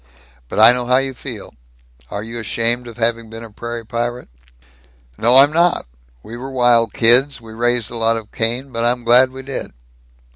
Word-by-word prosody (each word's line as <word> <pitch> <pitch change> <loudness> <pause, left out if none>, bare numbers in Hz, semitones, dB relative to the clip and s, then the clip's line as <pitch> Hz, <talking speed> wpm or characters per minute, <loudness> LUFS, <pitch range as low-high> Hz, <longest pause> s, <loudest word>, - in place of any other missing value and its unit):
But - - -3
I 110 +2 +8
know 125 0 -3
how 125 +1 +3
you 135 0 -1
feel. 120 -5 -9 0.6
Are 100 - -5
you 115 +1 -7
ashamed 115 +2 -1
of 115 - -11
having 115 -1 -1
been 115 +1 -9
a 115 - -11
prairie 120 +1 -7
pirate?" 120 - -4 0.9
"No, 120 - +3
I'm 140 +3 +6
not! 170 +2 +2 0.4
We 115 +2 -9
were 130 +2 -7
wild 120 -4 +2
kids 125 +7 +4
we 115 -1 -13
raised 120 0 0
a 120 - -5
lot 115 0 +1
of 110 -2 -10
Cain 120 +4 -2
but 115 -1 -3
I'm 120 +1 0
glad 125 +2 +5
we 130 +1 -10
did." 135 - -6
120 Hz, 190 wpm, -18 LUFS, 115-125 Hz, 0.9 s, I